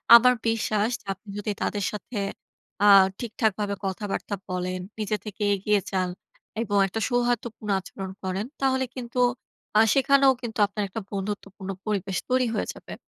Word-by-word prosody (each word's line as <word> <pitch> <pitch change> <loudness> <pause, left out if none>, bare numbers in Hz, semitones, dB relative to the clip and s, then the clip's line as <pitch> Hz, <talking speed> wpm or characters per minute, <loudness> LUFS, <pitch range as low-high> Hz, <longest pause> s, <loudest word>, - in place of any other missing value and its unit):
আমার 250 +2 +8
বিশ্বাস, 220 0 +1 0.2
আপনি 200 +2 -9
যদি 205 +1 -2
তাদের 205 -1 -1
সাথে 210 +2 -6 0.7
আ - - +7 0.3
ঠিকঠাকভাবে 215 -3 -1
কথাবার্তা 200 +1 -2
বলেন, 185 0 -2 0.2
নিজে 215 0 0
থেকে 210 0 -5
এগিয়ে 205 +1 +2
যান 185 -2 +1 0.5
এবং 205 -3 0
একটা 210 +4 -3
সৌহার্দ্যপূর্ণ 240 -3 -1
আচরণ 190 0 -7
করেন, 190 +2 -2 0.2
তাহলে 260 -1 +2
কিন্তু 250 -1 -4 0.6
আ - - +8
সেখানেও 275 0 +5
কিন্তু 230 -3 -5
আপনার 205 +1 -3
একটা 220 +4 -4
বন্ধুত্বপূর্ণ 195 -1 -5 0.2
পরিবেশ 195 -3 -1
তৈরি 255 0 +3
হয়ে 215 - -1
যাবে। - - -10
210 Hz, 140 wpm, -26 LUFS, 195-235 Hz, 0.7 s, আমার